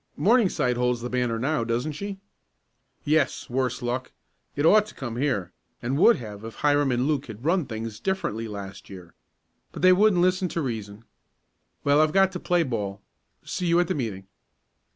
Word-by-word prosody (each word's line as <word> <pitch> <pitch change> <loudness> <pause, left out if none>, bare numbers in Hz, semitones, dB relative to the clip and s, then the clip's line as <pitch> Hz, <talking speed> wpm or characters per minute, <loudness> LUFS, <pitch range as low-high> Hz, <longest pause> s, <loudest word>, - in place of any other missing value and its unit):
"Morningside 195 - +2
holds 125 -1 0
the 125 - -5
banner 125 -2 0
now, 140 +3 0
doesn't 120 +6 -1
she?" 200 +6 -6 0.9
"Yes, 150 -4 +1
worse 125 -1 -1
luck. 125 +2 -3 0.4
It 145 - 0
ought 210 +5 +6
to - - -13
come 120 -4 -5
here, 110 -10 -1 0.3
and 125 +3 -2
would 235 +6 +7
have 105 -3 -8
if 115 0 -8
Hiram 145 -2 +2
and 125 +1 +1
Luke 145 -3 -1
had 110 +3 -10
run 170 -1 +2
things 110 -1 -6
differently 115 - -2
last 100 -2 -8
year. 90 -3 -11 0.6
But - - -8
they 185 0 +8
wouldn't 190 -2 +4
listen 185 0 +2
to 170 - -3
reason. 110 -3 -5 0.8
Well, 145 +1 +4
I've 155 -1 +2
got 195 0 +4
to - - -5
play 175 -2 +2
ball. 105 -7 -4 0.4
See 180 - -3
you 170 +1 +4
at 175 - +2
the - - +1
meeting." 105 -8 -4
130 Hz, 180 wpm, -25 LUFS, 115-170 Hz, 0.9 s, they